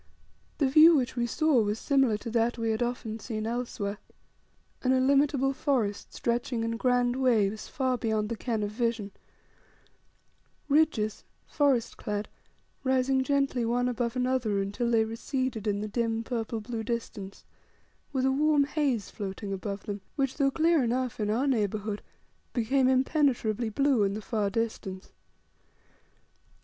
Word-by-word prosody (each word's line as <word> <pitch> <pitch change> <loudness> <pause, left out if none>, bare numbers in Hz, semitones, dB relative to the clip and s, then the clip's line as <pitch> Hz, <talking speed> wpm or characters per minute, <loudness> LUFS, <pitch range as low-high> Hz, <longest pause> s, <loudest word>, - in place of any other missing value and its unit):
The 285 - +2
view 315 +5 +8
which 255 -3 0
we 240 -1 0
saw 305 -1 +3
was 210 0 -1
similar 270 -5 +2
to 225 +2 -7
that 230 +1 +1
we 225 -1 0
had 220 - -2
often 240 -2 -3
seen 215 -1 -4
elsewhere. 225 -3 -3 0.8
An 255 0 +2
illimitable 270 +1 +3
forest 250 -8 -1
stretching 235 0 -1
in 230 0 -1
grand 245 +1 +1
waves 220 -5 +1
far 255 -2 -1
beyond 215 -2 0
the 230 - -2
ken 225 -2 -2
of 205 - -2
vision 225 -2 -1 1.6
ridges, 280 -8 +2 0.2
forest 275 -6 +1
clad, 210 0 -3 0.5
rising 260 0 +2
gently 275 -2 +1
one 245 +2 +1
above 240 0 -2
another 250 -5 0
until 205 +5 -1
they 225 -2 +3
receded 230 0 -3
in 205 0 0
the 215 - -3
dim 225 +1 -1
purple 225 -2 -3
blue 230 +1 -4
distance 220 -4 -5 0.7
with 265 -2 0
a 265 - +3
warm 295 +1 +3
haze 275 -8 -1
floating 195 -1 -5
above 200 +1 -5
them, 205 -2 -5
which, 270 -2 -1
though 275 -2 +3
clear 320 +1 +3
enough 245 0 -1
in 210 -1 0
our 235 +6 +1
neighbourhood, 210 -4 -1 0.5
became 255 +2 +2
impenetrably 255 -4 +1
blue 275 +1 +2
in 200 0 +1
the 215 - -5
far 210 -2 -1
distance. 200 -4 -4
235 Hz, 145 wpm, -28 LUFS, 215-265 Hz, 1.6 s, view